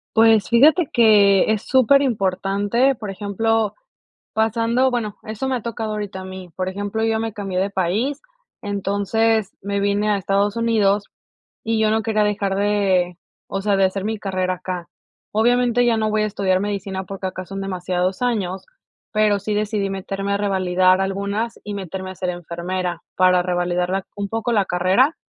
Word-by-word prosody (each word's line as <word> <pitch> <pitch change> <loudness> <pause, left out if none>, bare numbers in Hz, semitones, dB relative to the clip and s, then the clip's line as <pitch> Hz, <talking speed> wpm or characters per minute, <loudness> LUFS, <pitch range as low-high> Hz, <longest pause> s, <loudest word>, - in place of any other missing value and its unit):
Pues, 225 -2 +5
fíjate 295 +7 +5
que 210 -3 +5
es 215 -1 0
súper 265 +2 +4
importante, 205 +2 +1
por 210 -3 -6
ejemplo, 215 +2 0 0.6
pasando 230 +4 +2
bueno, 220 -4 -2
eso 220 +5 -4
me 260 - 0
ha 235 - -5
tocado 225 -2 -4
ahorita 205 -2 -5
a - - -8
mí. 185 -1 -9
Por 185 0 -2
ejemplo, 205 +3 -3
yo 225 - +2
ya 220 - +1
me 225 -1 -3
cambié 195 -3 -3
de 195 +1 0
país, 205 +10 -1 0.4
entonces 205 +2 0
me 200 0 -2
vine 205 +1 +1
a 205 - +3
Estados 200 +2 0
Unidos, 210 -3 +2 0.6
y 225 0 0
yo 215 0 +3
no 220 0 +1
quería 215 -1 +1
dejar 205 -2 0
de, 195 -3 +1 0.3
o 195 - -3
sea, 200 0 +1
de 195 - +3
hacer 195 +1 -3
mi 220 0 -2
carrera 185 -2 -1
acá. 180 -1 -6 0.4
Obviamente 245 +2 +3
ya 235 -2 +3
no 215 -1 0
voy 215 0 +1
a - - +1
estudiar 190 -2 0
medicina 195 -2 -3
porque 195 -1 -6
acá 185 0 -5
son 195 +1 -6
demasiados 185 +1 -2
años, 195 -6 -1 0.5
pero 210 -2 +2
sí 210 +2 -3
decidí 210 -1 -1
meterme 195 +1 -3
a - - +2
revalidar 185 -2 +2
algunas, 200 +4 -2
y 205 -1 -5
meterme 190 0 -5
a - - -13
ser 180 0 -2
enfermera 175 0 -4
para 185 -1 +4
revalidarla 180 +1 -1
un 200 -1 -4
poco 225 +2 -2
la 205 -3 +3
carrera. 185 - +2
200 Hz, 175 wpm, -21 LUFS, 190-220 Hz, 0.6 s, Pues